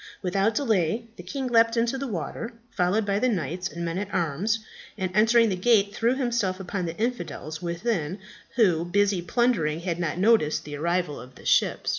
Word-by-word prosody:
Without 195 +4 +1
delay 220 - +1
the - - -9
king 265 +10 -4
leaped 230 -1 +3
into 235 +2 +1
the 275 +1 -3
water, 225 +4 -4 0.2
followed 200 +4 +1
by 200 0 +1
the 255 - +2
knights 180 - -2
and 170 0 -5
men 165 +2 -2
at 205 0 -5
arms, 175 +6 0 0.4
and 185 -3 -2
entering 225 +2 +5
the 190 - 0
gate, 205 +1 +3
threw 235 +4 +1
himself 235 -8 0
upon 185 -1 -3
the 165 - -5
infidels 215 -9 -3
within, 175 -1 -2 0.4
who, 185 -9 +3
busy 195 +1 +1
plundering, 170 -6 +1
had 170 -1 -2
not 170 -2 -2
noticed 195 -6 +3
the 145 0 -6
arrival 170 0 -1
of 125 +1 -13
the - - -15
ship. - - +2
195 Hz, 185 wpm, -26 LUFS, 170-230 Hz, 0.4 s, entering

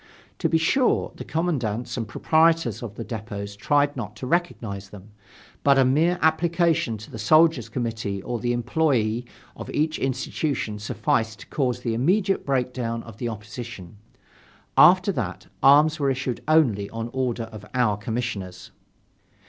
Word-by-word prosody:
To - - +1
be 160 - +3
sure, 240 +11 +2
the - - -8
commandants 125 -9 -2
and 115 -3 -3
proprietors 160 - +2
of 110 -4 -7
the 115 - -5
depots 105 -3 -6
tried 145 +7 +1
not 105 -5 -6
to - - -7
recognize 115 - -2
them, 105 +1 -13 0.5
but 140 -1 +5
a 135 - +5
mere 160 +7 +3
application 165 -6 +2
to 105 - -12
the 110 - -7
soldiers' 155 -1 +4
committee 110 -4 -3
or 120 -1 -3
the 120 +2 -1
employees 120 -2 0 0.3
of - - -8
each 155 +1 0
institution 135 -3 -2
sufficed 110 0 -1
to - - -12
cause 125 -3 -1
the 115 -2 -1
immediate 185 - +1
breakdown 125 -3 -1
of 115 -3 -12
the 120 +1 -3
opposition. 110 -3 -8 0.8
After - - +6
that, - - -4 0.2
arms 150 +3 +5
were 140 -1 +2
issued 130 -2 -2
only 125 -11 +3
on 115 +1 -5
order 125 -3 -1
of 110 -2 -10
our 120 -5 +2
Commissioners. 105 -3 -5
120 Hz, 150 wpm, -24 LUFS, 110-150 Hz, 0.8 s, After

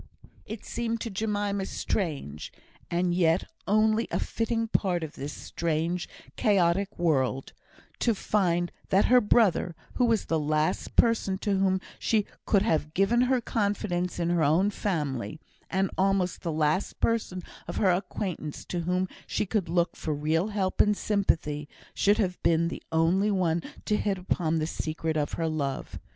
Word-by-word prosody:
It 220 0 -7
seemed 230 -1 -2
to 230 - -3
Jemima 205 -1 -1
strange 140 - -3 0.4
and 175 0 +1
yet 170 -1 +3 0.2
only 215 +2 +3
a - - -1
fitting 230 0 -1
part 180 -6 +1
of 155 - -6
this 140 +2 -5
strange, 170 +3 -2 0.3
chaotic 195 -1 +2
world 135 -6 0 0.5
to 230 -3 +2
find 175 -4 +1 0.2
that 195 +2 +4
her 250 0 +6
brother, 205 -6 +3 0.2
who 250 - +4
was 230 -3 +2
the 160 - 0
last 155 +1 0
person 225 -5 +3
to 200 +1 0
whom 190 -1 +2 0.2
she 215 -3 +2 0.2
could 200 -2 +4
have 155 -6 0
given 210 +6 +3
her 255 0 +3
confidence 200 -5 -1
in 170 0 0
her 170 -2 +2
own 170 +8 +3
family, 150 - -2 0.3
and 190 +1 0
almost 190 -2 +1
the 170 - -2
last 155 +4 0
person 210 -6 0 0.2
of - - -5
her 190 -3 +4
acquaintance 180 -4 -3
to 175 - -3
whom 180 +2 0 0.2
she - - -1
could 195 -3 -1
look 170 0 +1
for 155 -2 -3
real 160 +5 +1
help 200 -3 +1
and 210 -1 +2
sympathy, 155 -8 0 0.2
should 205 +1 +3
have 185 -5 -1
been 170 0 +3
the - - -6
only 170 +6 +3
one 175 -4 +1 0.2
to 210 - +2
hit 200 -2 0
upon 175 -3 0
the 155 - 0
secret 160 0 -3
of 150 -1 -1
her 165 - -1
love. 145 -4 -3
180 Hz, 160 wpm, -28 LUFS, 160-205 Hz, 0.5 s, her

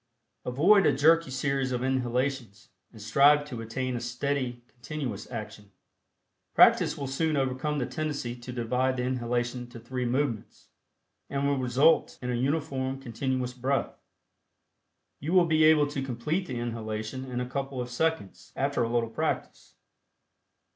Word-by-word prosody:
Avoid 175 +11 +5
a - - +3
jerky 160 +2 +4
series 135 0 -1
of 125 0 -1
inhalations, 125 -4 -2 0.2
and 110 - -14
strive 145 +7 +4
to 125 -6 -6
attain 125 +3 -3
a - - -2
steady 125 0 -2
continuous 120 -3 -6
action. 105 -1 -7 0.9
Practice - - +5
will 140 - -4
soon 150 +3 0
overcome 135 +3 -1
the 130 - 0
tendency 145 -6 -3
to 125 +1 -9
divide 125 +2 0
the 125 - -1
inhalation 120 -1 -1
into 120 -1 -10
three 125 +2 -4
movements, 120 -2 -2 0.6
and 140 0 0
will 140 -1 +1
result 130 +6 +3
in 125 0 -3
a - - 0
uniform 135 0 -1
continuous 130 0 -2
breath. 130 +1 -2 1.2
You 155 +5 -3
will 180 -2 +6
be 155 -1 +4
able 155 -2 +6
to 145 -2 -3
complete 135 +8 -2
the 125 - -4
inhalation 115 +1 -4
in 125 -2 -4
a 125 - -1
couple 135 0 -4
of 125 0 -4
seconds 120 - -2
after 140 -1 0
a 115 - +1
little 120 -1 +1
practice. - - -3
130 Hz, 150 wpm, -28 LUFS, 120-140 Hz, 1.2 s, will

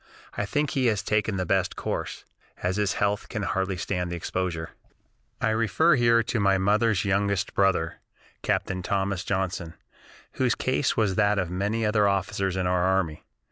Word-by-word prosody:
I 100 - -2
think 145 +5 0
he 130 -2 +1
has 105 -3 +1
taken 105 -1 0
the 95 - -1
best - - +1
course, - - -4 0.4
as 90 +2 0
his 105 -3 +1
health 100 +1 -1
can 110 -3 -3
hardly 95 -1 -1
stand 90 -1 -2
the - - -2
exposure." 85 -1 -3 0.7
I 110 - +1
refer 115 +10 +3
here 115 -2 +4
to 115 - -2
my 100 -1 +3
mother's 105 +1 +2
youngest 100 -1 0
brother, 90 -4 +1 0.4
Captain 90 -1 -1
Thomas 95 0 -1
Johnson, 95 -3 -2 0.6
whose 130 -2 +1
case 130 0 0
was 105 -4 +2
that 105 0 +3
of 90 -3 -1
many 105 +5 -1
other 105 -1 +3
officers 95 -1 0
in 95 -1 -1
our 90 0 +1
army. 95 -4 0
100 Hz, 170 wpm, -26 LUFS, 95-110 Hz, 0.7 s, here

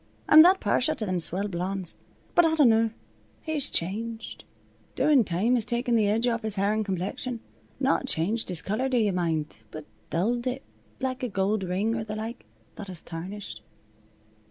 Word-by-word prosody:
I'm 310 - +10
that 370 +3 +6
partial 255 - +1
to 215 - -3
them 185 -2 -1
swell 185 +4 +1
blondes. 185 0 -3 0.4
But 345 - +6
I 320 -1 +3
dinnaw, 230 -7 +4 0.5
he's 315 -3 0
changed. 225 +6 -3 0.5
Doin' 290 -5 +4
time 195 +6 0
has 240 -3 +2
taken 240 +1 0
the 215 -2 +3
edge 220 +3 +1
off 235 -2 0
his 220 -2 -4
hair 200 +1 +1
an' 215 0 0
complexion. 200 +5 -3 0.4
Not 270 0 +1
changed 210 +4 0
his 170 -3 -3
color, 235 +7 -1
do 255 - +1
yuh 215 -3 +2
mind, 160 -9 -2
but 155 +4 -9 0.2
dulled 235 +9 0
it, 255 +2 -3 0.4
like 260 -1 -3
a 250 - -2
gold 195 +1 0
ring, 190 +5 -1
or 225 -1 -2
the 215 -1 -6
like, 220 - -6 0.3
that 205 - -7
has 180 -4 -8
tarnished." 180 - -7
215 Hz, 180 wpm, -27 LUFS, 185-245 Hz, 0.5 s, I'm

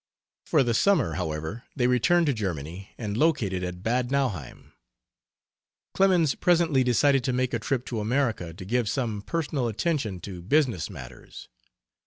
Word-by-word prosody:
For - - +4
the 120 -2 0
summer, 150 - +3
however, 80 - -4
they 125 - +1
returned 125 +8 +3
to 145 - +2
Germany, 90 - -5
and 105 -3 -4
located 110 - +1
at 90 0 -5
Bad 120 +2 0
Nauheim. 125 - -3 1.2
Clemens 180 -6 +3
presently 165 -6 +2
decided 135 +2 +3
to 130 - 0
make 125 0 0
a 120 - 0
trip 125 +3 -2
to 115 - -3
America 110 -6 -1
to 90 +2 -10
give 120 +1 0
some 115 -6 -2
personal 145 -1 -2
attention 115 - -1
to 90 -3 -7
business 115 - +1
matters. 65 - -11
120 Hz, 150 wpm, -26 LUFS, 95-140 Hz, 1.2 s, For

